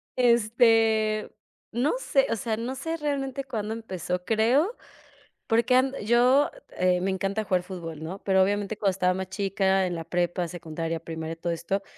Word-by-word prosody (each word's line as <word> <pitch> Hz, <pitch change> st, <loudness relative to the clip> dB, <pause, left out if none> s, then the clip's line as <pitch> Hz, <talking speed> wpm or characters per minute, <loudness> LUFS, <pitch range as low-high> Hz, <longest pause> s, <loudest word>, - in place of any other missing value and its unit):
Este, 225 Hz, -2 st, +3 dB, 0.4 s
no 245 Hz, -, +1 dB
sé, 275 Hz, -, +2 dB
o -, -, +2 dB
sea, 220 Hz, 0 st, -2 dB
no 245 Hz, +3 st, -4 dB
sé 325 Hz, +5 st, -3 dB
realmente 275 Hz, -3 st, -2 dB
cuándo 220 Hz, -4 st, -4 dB
empezó, 180 Hz, -5 st, -4 dB
creo, 250 Hz, -, +2 dB, 0.7 s
porque 235 Hz, +2 st, +2 dB
an 260 Hz, +1 st, +3 dB
yo, 250 Hz, +5 st, +4 dB, 0.3 s
eh, 180 Hz, 0 st, +3 dB
me 190 Hz, +2 st, 0 dB
encanta 195 Hz, +3 st, -1 dB
jugar 185 Hz, -2 st, +1 dB
fútbol, 165 Hz, -4 st, -7 dB
¿no? 185 Hz, +5 st, -6 dB
Pero, 190 Hz, -1 st, +3 dB
obviamente, 205 Hz, +2 st, 0 dB
cuando 195 Hz, -2 st, +1 dB
estaba 180 Hz, -1 st, +1 dB
más 190 Hz, 0 st, -4 dB
chica 195 Hz, -1 st, +1 dB
en 175 Hz, -1 st, -3 dB
la 165 Hz, -, -5 dB
prepa, 175 Hz, +1 st, -1 dB
secundaria, 165 Hz, -1 st, -4 dB
primaria 160 Hz, -1 st, -5 dB
y -, -, -25 dB
todo 170 Hz, +1 st, -2 dB
esto, 190 Hz, +4 st, -2 dB
205 Hz, 170 wpm, -26 LUFS, 180-235 Hz, 0.7 s, yo